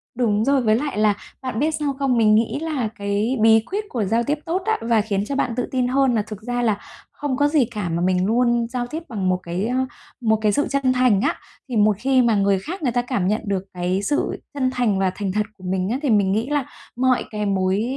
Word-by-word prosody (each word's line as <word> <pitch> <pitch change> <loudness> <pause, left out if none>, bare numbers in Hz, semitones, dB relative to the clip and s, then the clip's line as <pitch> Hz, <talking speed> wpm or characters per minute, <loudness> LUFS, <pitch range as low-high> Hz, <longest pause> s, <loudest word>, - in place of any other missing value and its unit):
Đúng 220 -3 +1
rồi, 275 -1 +3
với 215 -2 +3
lại 275 -1 -2
là 215 -1 +4 0.3
bạn 255 -4 -3
biết 310 +2 +2
sao 290 -2 -1
không? 265 -3 +1
Mình 215 -2 +5
nghĩ 230 +5 +1
là 290 -9 -2
cái 205 +5 -1
bí 225 0 +6
quyết 420 +2 -1
của 235 -4 -1
giao 230 +4 +1
tiếp 295 +4 -1
tốt 355 +3 -1
á 440 - +1
và 230 -1 +2
khiến 205 -2 -1
cho 280 - -2
bạn 250 -3 0
tự 250 - -1
tin 255 -2 +1
hơn 265 0 +2
là 215 - +2
thực 215 -1 -8
ra 245 +2 -2
là 220 -4 +1 0.4
không 275 -3 -2
có 290 - +3
gì 290 -4 +3
cả, 210 -5 -4
mà 165 +1 -1
mình 180 0 +2
luôn 235 +2 +2
giao 245 -1 -3
tiếp 320 +5 -6
bằng 195 -5 -1
một 185 - +2
cái, 175 +4 -2
ơ, 255 +2 0 0.4
một 220 -1 +3
cái 210 -1 +3
sự 290 +8 +1
chân 275 -2 +1
thành 250 -6 +3
á. - - +1 0.3
Thì 245 - -3
một 210 -1 +4
khi 260 +1 +3
mà 230 -3 +3
người 200 -1 +2
khác 335 - -6
người 250 - +1
ta 245 +1 +1
cảm 240 -7 -1
nhận 215 +3 0
được 195 -2 -1
cái 180 +2 -1
sự 290 +9 -1
chân 260 -3 0
thành 225 -6 +1
và 190 -1 +2
thành 200 -2 -2
thật 210 +1 0
của 185 - -17
mình 185 +1 -1
á, 245 - 0
thì 285 - 0
mình 200 -3 +3
nghĩ 225 +7 0
là 290 -3 0 0.3
mọi 255 0 +2
cái 210 -1 -2
mối 190 +1 +1
230 Hz, 260 wpm, -22 LUFS, 205-260 Hz, 0.4 s, bí